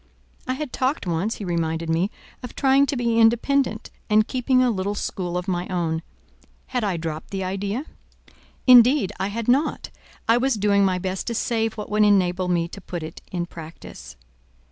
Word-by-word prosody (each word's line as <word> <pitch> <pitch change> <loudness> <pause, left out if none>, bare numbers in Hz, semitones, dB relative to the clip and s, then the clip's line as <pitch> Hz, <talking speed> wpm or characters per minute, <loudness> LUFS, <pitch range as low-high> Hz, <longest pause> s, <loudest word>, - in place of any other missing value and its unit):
I 255 - 0
had 295 -2 -5
talked 260 0 -1
once, 180 +6 -1
he 205 - -7
reminded 165 -1 -1
me, 165 +4 +1 0.3
of 250 - -9
trying 275 0 +4
to 285 - -1
be 235 -1 +1
independent 235 +1 +2 0.2
and 215 +1 +4
keeping 255 0 +2
a 250 - +3
little 200 0 -2
school 180 -3 -3
of 180 +2 -4
my 180 -1 -1
own: 165 -3 -1 0.6
had 250 -2 -2
I 195 -4 0
dropped 160 -1 -5
the 195 -1 -3
idea? 200 +8 -3 0.8
"Indeed, 250 -2 +6
I 195 - 0
had 225 +2 -4
not: 270 +5 +1 0.4
I 230 - +5
was 260 0 +1
doing 200 -1 +3
my 185 -2 +2
best 185 +1 -4
to 235 - -2
save 225 -1 0
what 210 -1 -7
would 210 0 +3
enable 185 -3 +3
me 170 -2 +1
to 200 - -10
put 175 -2 -6
it 160 +1 -8
in 175 -2 -2
practice." 165 - -11
205 Hz, 185 wpm, -23 LUFS, 180-240 Hz, 0.8 s, Indeed